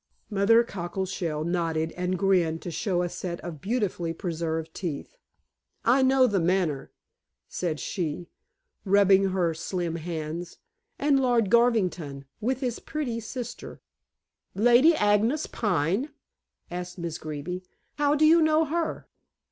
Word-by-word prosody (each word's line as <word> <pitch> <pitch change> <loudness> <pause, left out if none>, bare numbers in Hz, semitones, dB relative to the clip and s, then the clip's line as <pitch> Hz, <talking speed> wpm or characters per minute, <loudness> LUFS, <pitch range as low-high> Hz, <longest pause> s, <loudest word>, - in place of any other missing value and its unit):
Mother 210 +4 +5
Cockleshell 180 -5 -3
nodded 165 -2 -1
and 180 +1 -2
grinned 170 -4 +2
to 175 - -5
show 180 0 0
a - - 0
set 170 0 -5
of 165 -5 -7
beautifully 195 -7 -1
preserved 160 -2 -3
teeth. 170 - -5 0.7
"I 255 +4 +5
know 260 0 +5
The 205 -6 +1
Manor," 170 -5 0 0.6
said 165 -4 -3
she, 175 -3 -3 0.6
rubbing 195 -1 +5
her 185 -3 +1
slim 170 0 -3
hands. 165 +1 -5 0.4
"And 280 -1 +3
Lord 240 -6 +2
Garvington, 185 - +2
with 255 +4 -1
his 245 -3 -2
pretty 265 -7 -3
sister." 240 +2 -7 0.8
"Lady 245 +9 +6
Agnes 220 +5 +2
Pine?" 195 - 0 0.6
asked 180 +1 -5
Miss 170 -2 -4
Greeby. 155 +4 -5 0.4
"How 290 0 +3
do 305 +1 +4
you 330 +2 +6
know, 315 0 +4
her?" 330 +2 -2
185 Hz, 125 wpm, -27 LUFS, 170-235 Hz, 0.8 s, Lady